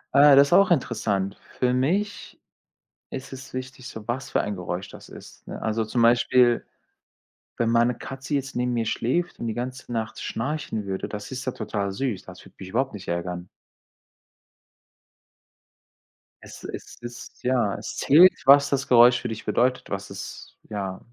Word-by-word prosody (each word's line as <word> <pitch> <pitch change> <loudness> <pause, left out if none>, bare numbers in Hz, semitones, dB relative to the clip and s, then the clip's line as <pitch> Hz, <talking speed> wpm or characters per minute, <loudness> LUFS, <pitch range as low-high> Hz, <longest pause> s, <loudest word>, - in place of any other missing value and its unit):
Äh, 140 0 +8
das 140 +1 +7
ist - - +1
auch 195 +2 +6
interessant. 100 - 0 0.2
Für 125 -1 +2
mich 185 +11 -1 0.7
ist 130 0 -7
es 130 0 -10
wichtig, 130 0 -7
so 110 -1 -9
was 125 +2 -3
für - - +1
ein 105 - -3
Geräusch 90 0 -4
das - - -13
ist, - - -13
ne? - - -6
Also 110 0 -1
zum 115 +2 0
Beispiel, 120 0 +4 1.0
wenn 115 - +1
meine 120 +1 +3
Katze 135 +2 -6
jetzt 140 0 -2
neben 125 0 0
mir 115 -2 -1
schläft 170 +11 -1
und - - -4
die 115 - -1
ganze 125 +1 -5
Nacht 110 -2 -3
schnarchen 125 -5 -3
würde, 95 -1 -3
das 105 -1 -7
ist 130 0 -5
ja 130 - -2
total 100 -3 -3
süß. 105 -3 -2
Das 90 -1 -12
würde - - -17
mich 95 -1 -9
überhaupt 130 +4 0
nicht 95 -2 -9
ärgern. 90 +1 -3 3.0
Es - - -12
es - - -8
ist 120 0 -10
ja, 125 -5 +1
es - - -6
zählt, 175 +6 +7
was 140 +1 +7
das 140 -1 -1
Geräusch 120 0 +7
für 120 - -4
dich 110 -1 -6
bedeutet, 125 +1 +1
was 100 0 -4
es 100 0 -9
ja, 100 -3 -4
120 Hz, 170 wpm, -25 LUFS, 105-135 Hz, 3.0 s, Äh